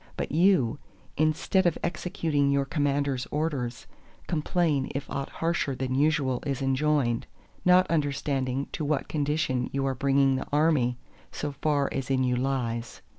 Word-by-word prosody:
But - - -3
you, 155 - +3 0.4
instead 155 +4 +2
of 170 - +1
executing 160 -5 0
you 140 0 +2
Commander's 140 -3 0
orders, 140 -6 -2 0.4
complain 155 -3 0
if 140 0 -3
aught 140 0 -3
harsher 165 -5 -1
than 130 0 -2
usual 140 -2 +1
is 140 -3 -2
enjoined; 135 -2 +1 0.4
not 180 +1 +6
understanding 140 -4 -1
to 155 - -4
what 145 -1 0
condition 145 -4 0
you 135 0 -1
are 135 - 0
bringing 135 +1 +2
the 130 - -5
army, 145 -5 +2 0.3
so 145 - -4
far 145 -1 0
as 135 -1 -3
in 130 -1 +2
you 125 -1 +1
lies. 120 -3 -2
140 Hz, 145 wpm, -27 LUFS, 130-155 Hz, 0.4 s, not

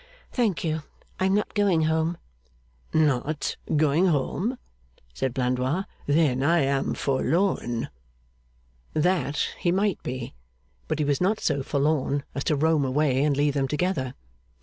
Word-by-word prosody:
'Thank 210 - 0
you: 160 -1 -1 0.4
I 185 - +2
am 190 - +2
not 210 - -1
going 195 -6 +3
home.' 160 +2 +1 0.7
'Not 150 -1 +1 0.2
going 155 +4 +3
home!' 185 - 0 0.6
said 130 - -1
Blandois. 130 +6 0 0.2
'Then 145 -3 +3
I 165 +4 +3
am 135 0 0
forlorn.' 140 -3 0 1.1
That 155 -2 +1
he 175 - +1
might 195 +1 +1
be; 125 -1 -5 0.5
but 155 - -1
he 150 - 0
was 145 +1 0
not 205 +4 +2
so 145 -3 0
forlorn 140 0 0
as 140 - -3
to 155 - +2
roam 155 0 +2
away 135 0 +2
and 145 -2 +2
leave 145 0 +2
them 135 -1 0
together. 150 -4 -1
150 Hz, 140 wpm, -26 LUFS, 135-170 Hz, 1.1 s, going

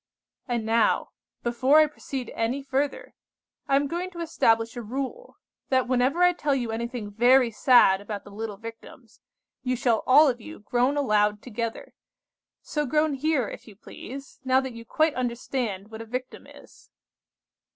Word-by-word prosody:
"And 240 -3 -2
now, 225 +1 +2 0.3
before 250 +5 +3
I 310 - +7
proceed 275 -3 -6
any 245 +5 -1
further, 280 - -2 0.5
I 275 - +3
am 280 +1 +3
going 345 +5 -3
to 350 -2 -11
establish 230 -8 +1
a 240 - -5
rule, 270 - -6 0.3
that 260 -1 +2
whenever 260 +7 +2
I 355 0 +5
tell 295 -5 0
you 240 -4 -2
anything 235 -2 -4
very 245 +3 +4
sad 215 -4 +5
about 205 0 -6
the 205 - -13
little 210 0 -6
Victims, 225 +2 -12 0.4
you 255 -1 -1
shall 235 -2 +1
all 295 +4 +7
of 245 -3 -1
you 315 - -10
groan 250 +6 +1
aloud 210 -6 +2
together. 230 -1 -5 0.7
So 295 -2 -2
groan 305 +2 +2
here, 275 -3 0
if - - -10
you 210 - -13
please, 270 +6 -10
now 260 0 +3
that 265 -2 -6
you 230 0 -10
quite 310 +6 +1
understand 235 -4 -3
what 220 0 -7
a - - -7
victim 255 +3 -6
is." - - -17
250 Hz, 165 wpm, -26 LUFS, 225-275 Hz, 0.7 s, I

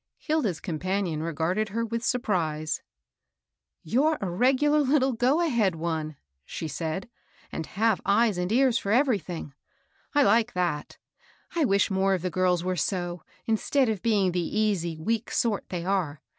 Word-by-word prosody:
Hilda's 275 - -1
companion 180 -1 -2
r^arded 170 +6 -1
her 230 +3 -1
with 230 +1 -3
surprise. 160 - -1 0.5
*' - - -59
You're 305 +5 +3
a 190 -3 -3
regular 270 +9 +3
little 270 -2 +2
go 255 +8 +2
ahead 235 - +2
one," 160 -2 -3 0.3
she 160 - -5
said, 160 +6 -4 0.2
" - - -30
and 160 - -4
have 220 0 +1
eyes 205 -1 +2
and 180 +2 -1
ears 250 0 +3
for 200 - -3
everything. 210 - 0 0.6
I 290 - +6
like 230 +1 +3
that. 175 -5 -2 0.6
I 325 -3 +3
wish 200 -2 +2
more 190 0 +2
of 180 - -5
the 185 - -1
girls 180 -1 +1
were 185 0 -1
so, 175 0 -2 0.2
instead 235 +4 +1
of 210 -4 -2
being 205 -5 +2
the 180 - -1 0.2
easy, 175 -7 0
weak 225 +7 -1
sort 220 -4 -1
they 175 -2 -4
are. 180 -7 -1
195 Hz, 160 wpm, -27 LUFS, 175-235 Hz, 0.6 s, I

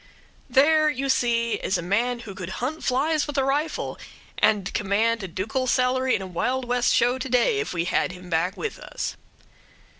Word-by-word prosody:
There, 310 +3 +5
you 275 -1 -2
see, 235 -2 +2
is - - 0
a - - -5
man 235 +7 0
who 210 -4 -8
could 185 -2 -7
hunt 285 +6 -3
flies 290 +5 +1
with 295 -1 -5
a 270 - +3
rifle, 290 +4 -1 0.4
and 205 -3 +2
command 215 +3 +1
a 190 - -4
ducal 220 +9 -2
salary 255 +1 +2
in 195 - -3
a - - -5
Wild 250 +9 -1
West 245 0 +1
show 245 +2 +3
to 265 - -4
day 335 - +3
if 430 - -3
we 170 -1 -1
had 185 - +1
him 180 0 -11
back 175 +3 0
with 450 - -4
us. - - -5
245 Hz, 190 wpm, -24 LUFS, 200-270 Hz, 0.4 s, There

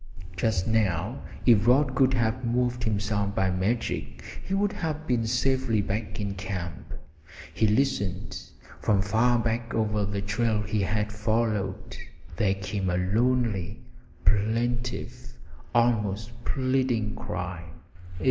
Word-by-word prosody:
Just 90 -1 +1
now, 110 0 0 0.2
if 115 -3 +5
Rod 130 +2 +4
could 130 -1 +3
have 115 +2 0
moved 120 0 0
himself 100 -1 0
by 95 -1 +2
magic, 95 +6 -2 0.2
he 195 - -2
would 205 +1 +1
have 155 -1 -3
been 120 -4 +1
safely 130 -1 +1
back 105 +1 -2
in 100 -1 -2
camp. 90 -4 -5 0.6
He 110 - +2
listened. 105 -5 0 0.5
From 100 -2 +2
far 115 +4 +3
back 115 +1 -1
over 105 -2 +1
the 100 0 -2
trail 105 +1 0
he 105 -1 -1
had 105 +2 -1
followed 105 -3 -1 0.4
there 95 +2 +2
came 95 0 -2
a 90 - +1
lonely, 110 0 +1 0.5
plaintive, 120 +4 0 0.4
almost 110 -2 +2
pleading 130 -5 0
cry. 90 -2 -5
110 Hz, 120 wpm, -27 LUFS, 100-120 Hz, 0.6 s, if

